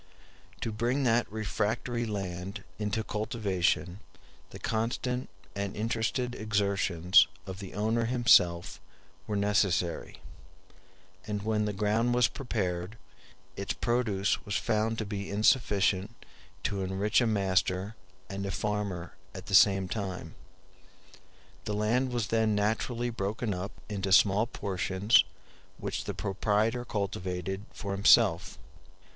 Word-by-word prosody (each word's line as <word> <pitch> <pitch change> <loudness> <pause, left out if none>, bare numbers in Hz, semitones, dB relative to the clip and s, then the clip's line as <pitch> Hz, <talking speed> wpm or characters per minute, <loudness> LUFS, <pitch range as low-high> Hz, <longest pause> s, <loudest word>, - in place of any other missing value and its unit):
To 115 - -2
bring 120 +6 0
that 120 -3 +2
refractory 110 +2 -2
land 95 -2 -5 0.2
into 105 +1 -1
cultivation, 100 -5 -1 0.5
the - - -10
constant 120 +3 -2 0.3
and 100 -1 -3
interested 115 +3 -1
exertions 100 -5 +3 0.2
of 95 0 -7
the 95 -3 -8
owner 110 +3 +1
himself 115 -8 +3 0.5
were 105 - -2
necessary; 100 -4 0 1.1
and 105 -1 -3
when 105 -1 +1
the 105 - -1
ground 110 +4 +1
was 125 -2 +5
prepared, 95 -6 -3 0.6
its 100 - -3
produce 110 -5 0
was 100 - -4
found 110 +1 0
to 110 - -2
be 100 -1 -5
insufficient 105 -1 +2 0.5
to 100 -1 -1
enrich 95 +5 +1
a 120 - +2
master 95 -1 0 0.3
and 100 0 -4
a - - -3
farmer 100 -4 -3 0.2
at 95 - -7
the 100 - -7
same 95 -1 +6
time. 95 -2 -5 1.3
The 105 - -2
land 120 +5 +1
was 120 -4 -2
then 110 -2 +2
naturally 115 +3 0
broken 105 +1 -2
up 90 +3 -5
into 100 -2 -3
small 100 +3 +5
portions, 95 -1 +2 0.5
which - - -4
the - - -4
proprietor 105 +4 0
cultivated 95 -2 -3
for 100 - -6
himself. 100 +1 +4
105 Hz, 120 wpm, -29 LUFS, 95-115 Hz, 1.3 s, same